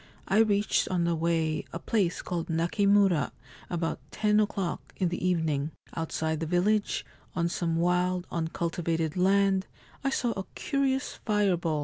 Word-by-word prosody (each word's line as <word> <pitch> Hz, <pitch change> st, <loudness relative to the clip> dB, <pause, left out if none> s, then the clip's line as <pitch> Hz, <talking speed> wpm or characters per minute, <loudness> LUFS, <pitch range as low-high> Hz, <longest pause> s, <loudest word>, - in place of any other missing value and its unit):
I 195 Hz, +3 st, +3 dB
reached 210 Hz, -2 st, +3 dB
on 180 Hz, -2 st, +1 dB
the 170 Hz, 0 st, +2 dB
way 160 Hz, -1 st, 0 dB
a -, -, -4 dB
place 190 Hz, -1 st, 0 dB
called 175 Hz, -3 st, -3 dB
Nakimura 180 Hz, 0 st, +3 dB, 0.4 s
about 170 Hz, -2 st, -2 dB
ten 210 Hz, -1 st, +2 dB
o'clock 200 Hz, -4 st, -2 dB
in 180 Hz, -, +1 dB
the 175 Hz, -, -4 dB
evening. 160 Hz, -4 st, 0 dB, 0.2 s
Outside 160 Hz, -1 st, -1 dB
the 165 Hz, -, -2 dB
village, 200 Hz, +5 st, +1 dB, 0.3 s
on 170 Hz, -1 st, +1 dB
some 170 Hz, -1 st, -1 dB
wild 180 Hz, +1 st, +1 dB
uncultivated 165 Hz, -1 st, -1 dB
land, 195 Hz, +1 st, +3 dB, 0.4 s
I 275 Hz, -, +2 dB
saw 245 Hz, -3 st, 0 dB
a 195 Hz, -3 st, -4 dB
curious 270 Hz, -2 st, -1 dB
fireball. 180 Hz, -7 st, +1 dB
175 Hz, 140 wpm, -28 LUFS, 165-200 Hz, 0.4 s, I